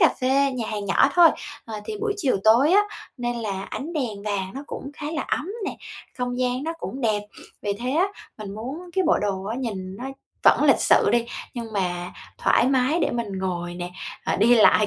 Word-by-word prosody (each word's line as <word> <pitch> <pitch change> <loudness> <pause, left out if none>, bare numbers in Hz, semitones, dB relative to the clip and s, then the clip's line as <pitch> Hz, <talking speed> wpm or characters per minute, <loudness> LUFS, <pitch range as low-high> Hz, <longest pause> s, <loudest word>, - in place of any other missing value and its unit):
cà 330 - +8
phê, 270 +2 +3
nhà 240 -3 -3
hàng 205 -1 -3
nhỏ 195 - +4
thôi. 345 -2 +8 0.4
Ờ, 220 -2 -6
thì 425 - -4
buổi 425 -1 0
chiều 280 - +1
tối 240 +9 +6
á, 410 +2 +7 0.3
nên 240 -1 -2
là 200 -4 -3
ánh 315 +5 -5
đèn 235 -10 -3
vàng 195 -3 -1
nó 275 - -5
cũng 280 - -6
khá 295 - -5
là 310 - -1
ấm 315 - -2 0.2
nè, - - -3 0.4
không 245 0 -2
gian 255 +1 0
nó 325 - -1
cũng 270 - -5
đẹp. 215 -4 +1 0.4
Vì 205 - 0
thế 240 +5 -3
á, 340 +7 +3 0.3
mình 200 -2 -6
muốn 275 +12 -6
cái 380 0 +1
bộ 335 - +4
đồ 195 -2 -1
á 220 +4 -3
nhìn 195 -6 -4
nó 250 - -7 0.4
vẫn - - +6
lịch - - +5
sự - - +5
đi, 235 0 +2 0.3
nhưng 230 -3 -5
mà 180 -3 -2 0.3
thoải - - +4
mái 265 +4 +2
để - - +2
mình 220 -5 -3
ngồi 175 -2 -3
nè, 175 0 -5 0.3
à, - - +1
đi 225 +5 +5
lại, 215 -2 +6
240 Hz, 220 wpm, -24 LUFS, 200-275 Hz, 0.4 s, cà